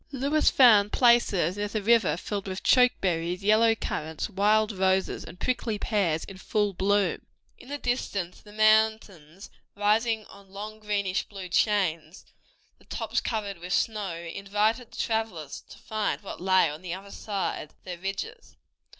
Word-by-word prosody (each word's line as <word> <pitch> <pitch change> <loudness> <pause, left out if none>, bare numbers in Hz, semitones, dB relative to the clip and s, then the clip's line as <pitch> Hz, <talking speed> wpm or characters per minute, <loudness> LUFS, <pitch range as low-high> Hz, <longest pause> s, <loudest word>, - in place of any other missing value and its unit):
Lewis 280 +3 +2
found 215 -6 +6
places 210 -8 +3
near 205 0 -1
the 210 0 -3
river 225 -5 +3
filled 200 +2 -4
with 190 0 -5
choke 250 -1 +5
cherries, 175 +1 -1
yellow 220 +2 +4
currants, 160 -2 -4
wild 210 +2 +2
roses, 190 -1 0
and 180 - -12
prickly 235 -4 -1
pears 195 -8 0
in 190 -1 -10
full 205 0 0
bloom. 195 0 0 0.3
In 250 - -14
the 290 - -3
distance 205 -9 -3
the 210 - -15
mountains, 215 -5 +1 0.2
rising 220 +2 +1
in 200 -2 -16
long 210 +3 -8
greenish 200 -3 -2
blue 195 -3 -8
chains, 175 -4 0 0.5
the - - -23
tops - - -2
covered 205 -5 -3
with 180 +2 -4
snow, 210 -6 -1
invited 205 +7 -1
the - - -13
travelers 220 - -3
to - - -12
find 215 -1 -3
what 195 - -8
lay 185 -1 +4
on 150 +2 -7
the 180 -1 -4
other 195 +1 -11
side 195 -7 -4
of - - -32
their 180 -2 -7
ridges. 195 - -6
205 Hz, 160 wpm, -27 LUFS, 185-220 Hz, 0.5 s, found